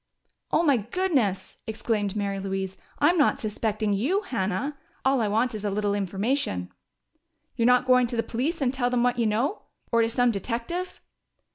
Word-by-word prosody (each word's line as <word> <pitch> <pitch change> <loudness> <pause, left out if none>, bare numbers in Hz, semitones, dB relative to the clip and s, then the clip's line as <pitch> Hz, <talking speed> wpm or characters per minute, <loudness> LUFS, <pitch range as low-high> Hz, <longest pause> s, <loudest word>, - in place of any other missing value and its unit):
"Oh, 330 - +3
my 285 -6 +4
goodness!" 235 - -1
exclaimed 220 -2 -1
Mary 200 -1 -1
Louise. 190 -1 -3 0.2
"I'm 335 +4 +3
not 290 - +3
suspecting 215 -1 -1
you, 285 - +1
Hannah! 240 - -2 0.3
All 265 -2 +3
I 215 - +1
want 225 +4 +1
is 215 -1 -5
a 205 - 0
little 205 0 0
information." 195 - -1 0.8
"You're 230 - +2
not 250 0 +5
going 250 -1 +5
to 240 - -4
the 230 - +1
police 275 +8 -2
and 250 -1 +1
tell 250 -2 +1
what 245 0 +1
you 230 - +3
know? 235 - 0 0.3
Or 230 - +4
to 225 - +2
some 245 +1 +3
detective?" 240 - -4
230 Hz, 170 wpm, -26 LUFS, 205-260 Hz, 0.8 s, not